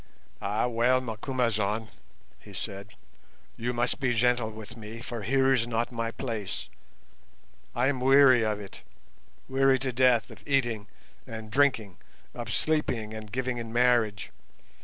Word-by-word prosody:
"Ah, 105 +4 0
well, 125 +2 +3
Macumazahn," 110 -3 -1 0.5
he - - -14
said, 100 +1 -7 0.6
"you 120 +2 -2
must 120 +2 +1
be 125 -3 +1
gentle 120 -1 +2
with 110 +1 -10
me, 110 0 -8
for 120 -1 -6
here 135 +5 +3
is 120 -3 +1
not 115 +1 -1
my 115 -1 -2
place. 115 -5 -4 1.1
I 125 - +2
am 135 -1 +1
weary 130 -2 +6
of 105 -1 -1
it, 100 -2 -10 0.7
weary 135 0 +3
to 130 -1 -3
death 125 -3 +3
of - - -13
eating 120 -7 0 0.4
and 110 -1 -8
drinking, 115 -9 +2 0.4
of 120 -2 -6
sleeping 115 -8 0
and 110 -1 -8
giving 125 0 -2
in 115 -1 -6
marriage. 120 -4 +2
120 Hz, 140 wpm, -28 LUFS, 110-130 Hz, 1.1 s, weary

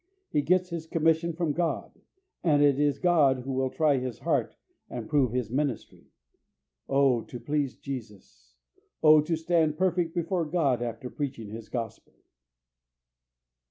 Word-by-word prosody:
He 150 - +2
gets 180 +4 +2
his 165 -1 -5
commission 165 +1 +2
from 165 -1 -1
God, 170 +1 -3 0.4
and 145 -4 +4
it 140 -1 +4
is 145 -2 +2
God 145 -8 +3
who 135 +2 -5
will 130 0 0
try 150 -1 +2
his 125 -3 -4
heart - - -1 0.3
and 120 -3 -6
prove 140 -6 +2
his 125 -3 -2
ministry. 140 -2 -3 0.8
Oh, 135 -3 +3
to 120 - -8
please 140 +2 -1
Jesus! 105 - -9 0.5
Oh, 155 -1 +8
to 165 +2 -1
stand 160 -2 +1
perfect 175 -2 0
before 175 0 0
God 150 -7 +1
after 120 +1 -5
preaching 125 -7 -5
His 110 0 -8
Gospel! 115 -4 -6
145 Hz, 145 wpm, -28 LUFS, 125-165 Hz, 0.8 s, Oh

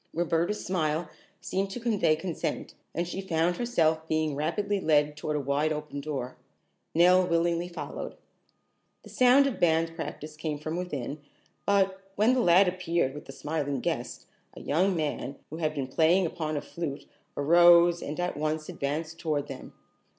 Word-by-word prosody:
Roberta's 170 +4 0
smile 160 -3 -1 0.3
seemed 195 +1 -2
to 200 - -5
convey 220 -9 +2
consent, 160 +1 -4 0.2
and 170 +1 -1
she 190 +2 -4
found 175 -1 0
herself 160 -10 +1
being 155 -1 0
rapidly 185 +7 -1
led 150 -2 +2
toward 150 0 -3
a - - +1
wide 145 +3 0
open 150 -2 -4
door. 135 -4 -5 0.6
Nell 180 +2 +6
willingly 170 0 +1
followed. 180 - -6 0.9
The - - -13
sound 255 +2 +5
of 275 -4 -2
band 165 -1 +2
practice 155 -2 -6
came 155 -1 -3
from 155 +2 -4
within, 150 -5 -4 0.5
but, 195 -1 +2
when 220 +5 +4
the 255 - +2
lad 185 -1 +6
appeared 175 -6 0
with 150 - -9
the - - -9
smiling 145 -1 -3
guest, - - -3 0.3
a - - -9
young 180 +6 +1
man, 145 -3 -2 0.2
who 160 - -5
had 155 -2 -1
been 140 -2 -2
playing 165 +7 +3
upon 155 -2 -3
a - - -2
flute, 150 -2 -5 0.3
arose 170 +3 +6
and 150 +3 -5
at 180 0 -1
once 155 +1 -2
advanced 155 +4 -3
toward 150 -4 -1
them. 135 - -8
160 Hz, 165 wpm, -28 LUFS, 150-180 Hz, 0.9 s, Nell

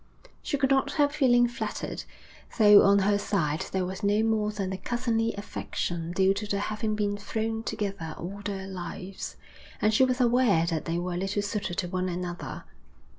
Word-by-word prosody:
She 285 - -1
could 270 0 +1
not 270 0 +2
help 290 -1 +3
feeling 245 -4 +4
flattered, 240 - -4 0.5
though 210 -2 +8
on 200 0 +5
her 205 0 +3
side 165 -7 -1
there 190 -1 0
was 190 +2 -5
no 205 +1 +2
more 220 -1 +1
than 195 -3 -3
the 190 - -3
cousinly 230 +1 -1
affection 175 -4 -4
due 190 +1 +3
to 205 +1 -4
their 200 -1 -1
having 215 +1 -2
been 205 -1 0
thrown 220 +2 -2
together 195 -8 -4
all 200 +4 -6
their 195 -1 -4
lives, 185 +1 -6 0.4
and 215 +1 +2
she 240 - +5
was 255 0 +1
aware 240 -8 +4
that 165 -2 -2
they 165 0 -1
were 175 0 -2
little 195 +2 -1
suited 200 -3 -3
to 180 - -1
one 185 +1 -2
another. 175 0 -5
205 Hz, 180 wpm, -28 LUFS, 185-225 Hz, 0.5 s, though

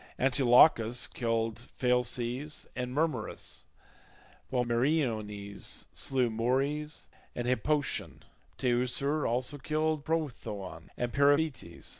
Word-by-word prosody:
Antilochus 125 -2 +5
killed 115 -2 -1 0.2
Phalces 125 +3 0
and 125 0 -3
Mermerus, 155 +4 -2 0.8
while 125 -2 +1
Meriones 115 -6 -1
slew 125 -3 +1
Morys 135 +7 -1 0.3
and 120 - -3
Hippotion, 135 +4 0 0.3
Teucer 130 +4 +1
also 130 +5 -1
killed 155 +1 0
Prothoon 110 - -4
and 120 -1 -2
Periphetes. 145 - +1
125 Hz, 85 wpm, -30 LUFS, 115-145 Hz, 0.8 s, Antilochus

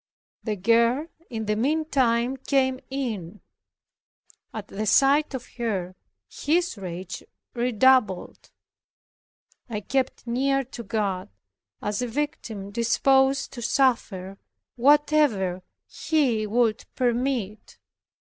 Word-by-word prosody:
The 215 -2 -2
girl 235 - +3 0.2
in 220 -2 -4
the 210 0 0
meantime 260 -2 +1
came 260 -1 +1
in. 215 -9 -4 1.1
At 215 -2 -7
the 215 +2 -4
sight 275 +6 +4
of 250 - -6
her 190 -6 -2 0.3
his 345 +1 0
rage 185 -1 -7 0.3
redoubled. 245 -4 +2 1.2
I 210 -2 -3
kept 260 +4 -2
near 270 +3 +1
to 250 -1 -9
God, 200 - -2 0.5
as 210 +2 -1
a 245 - -1
victim 230 -7 -4
disposed 265 +4 +2
to 240 - -7
suffer 225 -7 0 0.4
whatever 270 -9 +3 0.3
He 260 -9 0
would 225 0 +1
permit. 240 -4 -1
235 Hz, 100 wpm, -25 LUFS, 210-270 Hz, 1.2 s, sight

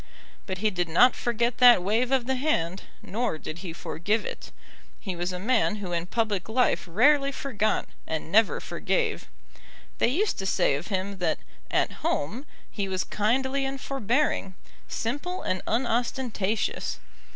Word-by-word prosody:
But 190 -1 -3
he 215 +3 +1
did 175 -3 -1
not 245 +10 +6
forget 235 0 -1
that 245 -7 +8
wave 225 +6 +1
of 260 -3 +2
the 265 - 0
hand, 195 - 0 0.2
nor 225 -4 -2
did 155 +1 -7
he 175 -2 -6
forgive 205 +6 -1
it. - - -7 0.5
He 190 -4 -4
was 175 +1 -2
a 180 - -4
man 220 +2 +2
who 200 -4 -5
in 170 0 -1
public 215 -2 -1
life 250 +3 +2
rarely 275 - +4
forgot, 220 -6 -1 0.2
and 160 0 -4
never 220 +2 +4
forgave. 460 -3 -1 0.7
They - - +4
used 370 - 0
to 195 - -2
say 160 - +2
of 145 +5 -3
him 195 -1 -2
that 165 -3 +1 0.3
"at - - +1
home" 230 - -1 0.2
he 200 -2 -2
was 185 -1 -1
kindly 265 +6 0
and 270 0 -3
forbearing, 250 -6 0 0.3
simple 290 +10 -3
and 185 0 -1
unostentatious. 235 -3 -1
220 Hz, 155 wpm, -27 LUFS, 185-255 Hz, 0.7 s, that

